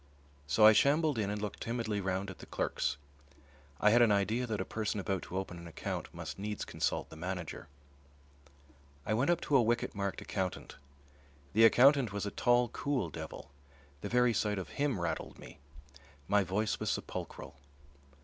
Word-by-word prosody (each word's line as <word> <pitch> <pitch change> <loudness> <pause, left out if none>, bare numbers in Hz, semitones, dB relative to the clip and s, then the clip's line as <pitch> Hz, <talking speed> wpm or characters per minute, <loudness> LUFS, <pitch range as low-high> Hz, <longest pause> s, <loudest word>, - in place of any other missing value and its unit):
So 105 +9 +5
I 110 - +10
shambled 145 +3 +3
in 100 -2 0
and 105 0 -2
looked 105 -1 -5
timidly 115 -3 -2
round 95 +1 -2
at 95 - -13
the - - -11
clerks. 70 - -1 0.8
I 105 - +5
had 120 +2 +6
an 115 -3 +5
idea 110 +5 +1
that 110 -2 -2
a 95 - -2
person 110 -1 -2
about 95 -1 -2
to 90 - -6
open 95 -2 -4
an 85 - -9
account 85 - -5
must - - -7
needs 105 +1 -4
consult - - -2
the - - -9
manager. 90 0 -5 1.4
I 110 - 0
went 125 +8 +1
up 175 -1 +2
to 145 - 0
a 135 - +7
wicket 120 +1 0
marked 100 -1 -3
"Accountant." 95 -2 -4 0.8
The 110 +2 +7
accountant 130 0 +6
was 100 0 -3
a 100 - -3
tall, 120 +1 +3
cool 140 +2 -2
devil. 80 -3 -8 0.5
The - - -4
very 125 -1 +3
sight 105 -2 0
of 90 -5 -5
him 140 - -1
rattled 85 -1 -3
me. - - -13 0.7
My 100 -1 +3
voice 100 +4 -1
was - - -2
sepulchral. - - -5
105 Hz, 180 wpm, -32 LUFS, 95-120 Hz, 1.4 s, I